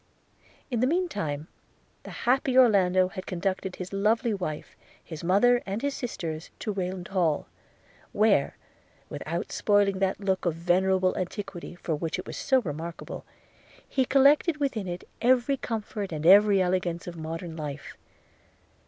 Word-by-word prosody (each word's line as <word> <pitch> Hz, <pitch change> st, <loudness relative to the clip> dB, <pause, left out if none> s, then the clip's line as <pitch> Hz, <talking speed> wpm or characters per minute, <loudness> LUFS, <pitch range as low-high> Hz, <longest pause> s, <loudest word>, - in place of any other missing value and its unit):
In 240 Hz, -, 0 dB
the 250 Hz, -, +3 dB
mean 355 Hz, +5 st, +1 dB
time 150 Hz, -, -4 dB, 0.5 s
the -, -, -11 dB, 0.2 s
happy 260 Hz, +1 st, +2 dB
Orlando 185 Hz, -7 st, +5 dB
had 185 Hz, 0 st, -8 dB
conducted 185 Hz, 0 st, -2 dB
his 185 Hz, +1 st, -7 dB
lovely 220 Hz, +4 st, +1 dB
wife, 165 Hz, -6 st, -5 dB, 0.3 s
his 160 Hz, -2 st, -8 dB
mother 240 Hz, +8 st, +4 dB
and 200 Hz, +5 st, -4 dB
his 285 Hz, 0 st, 0 dB
sisters, 165 Hz, -10 st, -5 dB
to 215 Hz, -, -3 dB
Rayland 185 Hz, -2 st, -4 dB
Hall; 170 Hz, -6 st, +1 dB, 0.7 s
where, 205 Hz, -9 st, +2 dB, 0.5 s
without 170 Hz, +3 st, -4 dB
spoiling 205 Hz, -2 st, +2 dB
that 190 Hz, -1 st, 0 dB
look 190 Hz, -2 st, -1 dB
of 165 Hz, -, 0 dB
venerable 185 Hz, +2 st, +2 dB
antiquity 185 Hz, -1 st, -5 dB
for 170 Hz, -2 st, -3 dB
which 160 Hz, +1 st, -2 dB
it -, -, -6 dB
was -, -, -7 dB
so 265 Hz, -1 st, +2 dB
remarkable, 165 Hz, -2 st, -6 dB, 0.6 s
he 265 Hz, -, +1 dB
collected 285 Hz, +5 st, +4 dB
within 260 Hz, -9 st, -2 dB
it 175 Hz, 0 st, -6 dB
every 255 Hz, +2 st, +3 dB
comfort 215 Hz, -5 st, -4 dB
and 155 Hz, -1 st, -4 dB
every 200 Hz, +2 st, +7 dB
elegance 180 Hz, -2 st, 0 dB
of 175 Hz, -, -7 dB
modern 165 Hz, +1 st, -6 dB
life. 150 Hz, -3 st, -6 dB
190 Hz, 145 wpm, -27 LUFS, 170-225 Hz, 0.7 s, every